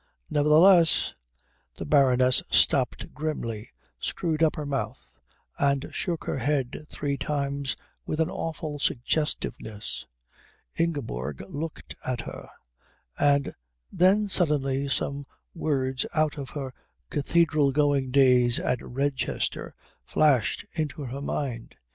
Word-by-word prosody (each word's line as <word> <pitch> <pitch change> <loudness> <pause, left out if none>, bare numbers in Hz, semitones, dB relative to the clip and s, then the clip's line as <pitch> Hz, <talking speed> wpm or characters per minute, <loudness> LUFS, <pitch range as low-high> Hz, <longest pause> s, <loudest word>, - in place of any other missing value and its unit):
Nevertheless 160 - +5 0.3
" - - -42
The - - -5
Baroness 130 -3 +4
stopped - - +2
grimly, 120 -8 -4 0.3
screwed 160 -2 -2
up 160 -2 +4
her 150 - -4
mouth, 135 - -4 0.4
and 140 -1 +1
shook 175 -3 -2
her - - -2
head 140 +2 -1
three 140 -1 -2
times 140 -2 -2 0.3
with 155 - -2
an 160 - +3
awful 155 -3 -4
suggestiveness. 120 -5 -2 0.7
Ingeborg 95 - -2
looked 155 +2 -6
at 125 -2 -2
her, - - -9 0.7
and 140 -1 +3 0.4
then 195 +4 +4
suddenly 140 -7 +1
some 140 0 -1 0.3
words 130 -4 -1
out 155 -1 +2
of 135 -2 -6
her 135 -3 -5 0.4
cathedral 155 -1 +2
going 140 -2 +2
days 125 -3 +5
at 125 - 0
Redchester 135 0 -2 0.3
flashed 140 -8 +2
into 150 -3 -3
her 135 +2 -5
mind. 130 -5 -4
140 Hz, 110 wpm, -27 LUFS, 130-155 Hz, 0.7 s, Nevertheless